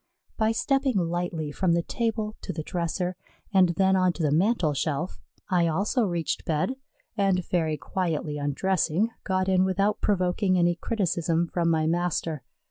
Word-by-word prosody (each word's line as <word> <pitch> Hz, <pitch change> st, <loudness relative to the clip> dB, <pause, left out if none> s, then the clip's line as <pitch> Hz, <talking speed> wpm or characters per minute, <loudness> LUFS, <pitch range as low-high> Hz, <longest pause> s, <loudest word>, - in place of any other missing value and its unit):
By 220 Hz, -1 st, +2 dB
stepping 270 Hz, +2 st, +1 dB
lightly 170 Hz, -3 st, -2 dB
from 175 Hz, +3 st, +1 dB
the 170 Hz, 0 st, +1 dB
table 220 Hz, -1 st, -2 dB
to -, -, -4 dB
the 155 Hz, -1 st, -5 dB
dresser, 180 Hz, +2 st, -2 dB, 0.4 s
and 185 Hz, -2 st, +5 dB
then 190 Hz, -1 st, +3 dB
on 185 Hz, -1 st, +3 dB
to 170 Hz, -, -4 dB
the 150 Hz, -, +2 dB
mantel 175 Hz, -1 st, +2 dB
shelf, 155 Hz, +5 st, -2 dB, 0.3 s
I 175 Hz, -2 st, +3 dB
also 205 Hz, -, +1 dB
reached 170 Hz, -4 st, -2 dB
bed, 160 Hz, +11 st, 0 dB, 0.4 s
and, 195 Hz, -4 st, +1 dB
very 160 Hz, -4 st, 0 dB
quietly 150 Hz, 0 st, -2 dB
undressing, 180 Hz, +7 st, 0 dB
got 185 Hz, -1 st, 0 dB
in 185 Hz, -1 st, +4 dB
without 195 Hz, +2 st, +1 dB
provoking 185 Hz, -1 st, +1 dB
any 175 Hz, 0 st, +3 dB
criticism 170 Hz, -4 st, 0 dB
from 170 Hz, -1 st, +1 dB
my 160 Hz, -1 st, +2 dB
master. 165 Hz, -2 st, -1 dB
180 Hz, 155 wpm, -26 LUFS, 165-195 Hz, 0.4 s, and